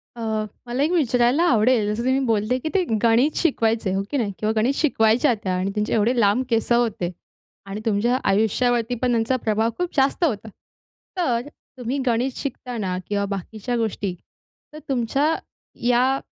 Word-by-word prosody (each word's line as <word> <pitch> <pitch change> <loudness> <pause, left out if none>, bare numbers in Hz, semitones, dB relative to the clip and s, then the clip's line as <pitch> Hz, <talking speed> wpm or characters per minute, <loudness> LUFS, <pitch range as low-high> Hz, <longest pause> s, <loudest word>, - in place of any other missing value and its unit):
अ, 235 - -8 0.4
मला 245 +3 -1
एक 310 - +1
विचारायला 255 -2 +2
आवडेल, 230 -3 +3
जसं 235 +2 -3
तुम्ही 260 +1 +2
बोलले, 225 +1 +1
की 315 - -3
ते 380 - +4 0.2
गणित 235 +6 +3
शिकवायचं 225 - +1
हो 195 - 0
की 290 - 0
नाही 220 -6 -1
किंवा 215 0 0
गणित 245 +5 +2
शिकवायच्या 245 -2 +3
त्या 185 -1 -1
आणि 185 +2 -1
त्यांचे 210 0 -1
एवढे 230 +3 +2
लांब 215 +4 +3
केस 230 +1 0
होते 230 -7 +1 0.5
आणि 200 +2 -6
तुमच्या 225 +3 +2
आयुष्यावरती 230 +4 +1
पण 250 -1 +2
त्यांचा 230 +2 +1
प्रभाव 220 +1 +1
खूप 355 0 -1
जास्त 275 +5 +2
होता. 225 -9 0 0.7
तर, 250 -10 +1 0.4
तुम्ही 250 +2 -3
गणित 245 +2 +1
शिकताना 240 -8 -4
किंवा 200 -1 0
बाकीच्या 205 +4 -4
गोष्टी, 210 -4 -2 0.6
तर 305 - -8
तुमच्या 275 +5 +1 0.5
या 255 +2 +3
235 Hz, 160 wpm, -23 LUFS, 215-260 Hz, 0.7 s, ते